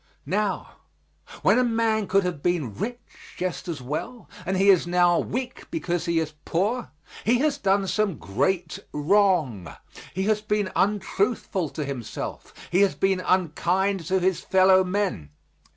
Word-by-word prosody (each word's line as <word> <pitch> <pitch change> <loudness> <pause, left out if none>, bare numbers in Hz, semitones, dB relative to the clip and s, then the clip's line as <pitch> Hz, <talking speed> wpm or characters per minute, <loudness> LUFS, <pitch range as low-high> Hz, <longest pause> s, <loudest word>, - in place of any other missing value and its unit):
Now, 205 0 -2 0.7
when - - +5
a - - +4
man 225 -3 +1
could 195 +1 +3
have 180 -5 -3
been 160 -10 0
rich 235 - -4 0.4
just 180 -1 -3
as 160 -7 -5
well, 155 - -5 0.2
and 190 0 0
he 195 +2 +4
is 180 -2 +3
now 175 0 +3
weak 250 +2 -4
because 175 - -2
he 170 -1 0
is 155 -1 -3
poor, 215 +8 -1 0.3
he 240 +3 +3
has 285 +2 +1
done 195 -2 +2
some 200 -4 0
great 145 - -1
wrong; 150 - +1 0.4
he 190 - 0
has 210 +1 +1
been 210 -3 -1
untruthful 200 -3 0
to 150 - -4
himself; 135 -5 -6 0.2
he 180 +3 +3
has 200 -2 +3
been 195 -1 +1
unkind 185 +2 +1
to 190 0 +2
his 185 0 +1
fellowmen. 185 - +3
190 Hz, 150 wpm, -25 LUFS, 170-205 Hz, 0.7 s, when